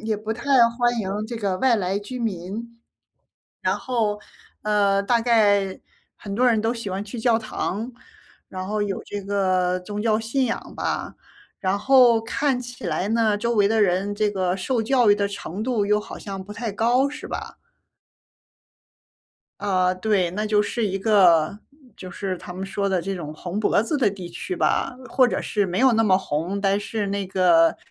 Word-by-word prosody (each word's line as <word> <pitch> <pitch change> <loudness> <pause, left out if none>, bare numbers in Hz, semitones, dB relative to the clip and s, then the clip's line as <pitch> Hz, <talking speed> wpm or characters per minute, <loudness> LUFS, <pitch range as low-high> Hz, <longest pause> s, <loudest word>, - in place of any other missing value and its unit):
也 220 -1 0
不 215 +1 -4
太 225 - -8 0.4
欢 240 0 +2
迎 205 +1 -3
这 235 +1 -5
个 200 -4 -2
外 260 +1 +3
来 190 -1 -1
居 205 +5 -8
民。 225 +2 -5 0.8
然 - - +1
后， 220 -5 -1 0.4
呃， 200 -2 +2
大 235 +4 +2
概 205 -5 +2 0.4
很 200 -1 -7
多 250 +4 +3
人 230 -3 +3
都 225 +2 0
喜 230 -4 -5
欢 190 +2 -3
去 210 +3 -8
教 230 -1 +3
堂， 220 0 -4 0.6
然 185 0 -6
后 210 0 -1
有 200 -2 -3
这 205 0 -5
个 185 -2 0
宗 205 +3 -5
教 220 -1 +2
信 235 +4 0
仰 230 - -5
吧。 - - -3 0.5
然 190 +1 0
后 250 -1 +5
看 270 +3 0
起 245 0 -8
来 190 - -1
呢， 220 -2 +2
周 235 +3 -1
围 205 -2 +4
的 220 0 +3
人 195 +1 +1
这 210 0 +1
个 185 -2 -1
受 230 +5 -1
教 240 -1 +3
育 - - +7
的 200 -1 -1
程 200 0 -6
度， 235 -4 0
又 210 0 +2
好 - - -9
像 195 -2 -6
不 205 +2 -10
太 225 0 -4
高， 240 +6 +2
是 295 +2 -8
吧？ - - -6 2.0
啊， 185 -2 +2
对， 185 -2 0
那 210 +4 -2
就 210 -1 +3
是 225 +1 -1
一 195 0 -2
个 190 -4 +4 0.4
就 185 - -9
是 190 +1 -3
他 - - -11
们 185 +2 -5
说 200 +1 -2
的 190 -2 +1
这 195 +3 -3
种 155 -5 -6
红 180 +6 -4
脖 210 - +2
子 230 - -3
的 245 -6 +3
地 190 -3 -7
区 175 - -5
吧。 250 - 0
或 255 -3 +4
者 - - -2
是 205 -2 0
没 180 0 -2
有 260 -1 +5
那 225 0 +3
么 195 -4 +4
红， 180 +1 -2
但 200 0 +1
是 205 -1 -3
那 200 0 -2
个 175 -3 +4
205 Hz, 205 characters per minute, -23 LUFS, 190-225 Hz, 2.0 s, 育